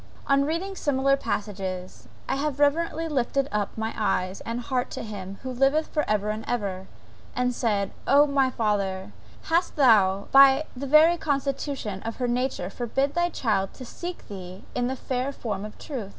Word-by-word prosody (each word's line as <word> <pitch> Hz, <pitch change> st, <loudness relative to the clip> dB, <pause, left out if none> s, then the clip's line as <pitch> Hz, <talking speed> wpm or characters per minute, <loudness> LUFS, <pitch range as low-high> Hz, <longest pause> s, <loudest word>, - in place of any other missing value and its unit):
On 275 Hz, 0 st, +3 dB
reading 345 Hz, +6 st, -2 dB
similar 275 Hz, -4 st, +2 dB
passages 190 Hz, -7 st, -4 dB, 0.2 s
I -, -, 0 dB
have 290 Hz, 0 st, -2 dB
reverentially 325 Hz, +2 st, +2 dB
lifted 275 Hz, -1 st, 0 dB
up 210 Hz, 0 st, -2 dB
my 220 Hz, 0 st, -2 dB
eyes 185 Hz, -3 st, -1 dB
and 230 Hz, +1 st, -2 dB
heart 250 Hz, 0 st, -1 dB
to -, -, -6 dB
Him 200 Hz, -3 st, -7 dB
who 260 Hz, -, -4 dB
liveth 275 Hz, +5 st, +2 dB
for 300 Hz, -, -1 dB
ever 210 Hz, 0 st, +1 dB
and 215 Hz, +1 st, -5 dB
ever, 195 Hz, -5 st, -2 dB, 0.5 s
and 250 Hz, 0 st, +1 dB
said, 205 Hz, -5 st, 0 dB, 0.2 s
O 285 Hz, +1 st, +6 dB
my 275 Hz, -2 st, +2 dB
Father, 200 Hz, -5 st, -1 dB, 0.3 s
hast 340 Hz, +2 st, +1 dB
Thou 200 Hz, -8 st, +4 dB
by 275 Hz, +1 st, +7 dB
the 275 Hz, +3 st, -5 dB
very 315 Hz, +5 st, +6 dB
constitution 275 Hz, -, -2 dB
of 225 Hz, 0 st, -5 dB
her 250 Hz, -, -1 dB
nature 245 Hz, -6 st, -1 dB
forbid 270 Hz, +5 st, -1 dB
Thy 345 Hz, +1 st, +1 dB
child 210 Hz, -, -1 dB
to 255 Hz, -, -9 dB
seek 350 Hz, +8 st, -7 dB
Thee 185 Hz, -1 st, -9 dB
in 245 Hz, 0 st, 0 dB
the 260 Hz, -, -2 dB
fair 255 Hz, +1 st, -2 dB
forms 210 Hz, -6 st, -4 dB
of 210 Hz, -, -14 dB
truth? 245 Hz, -10 st, -6 dB
250 Hz, 175 wpm, -26 LUFS, 205-280 Hz, 0.5 s, by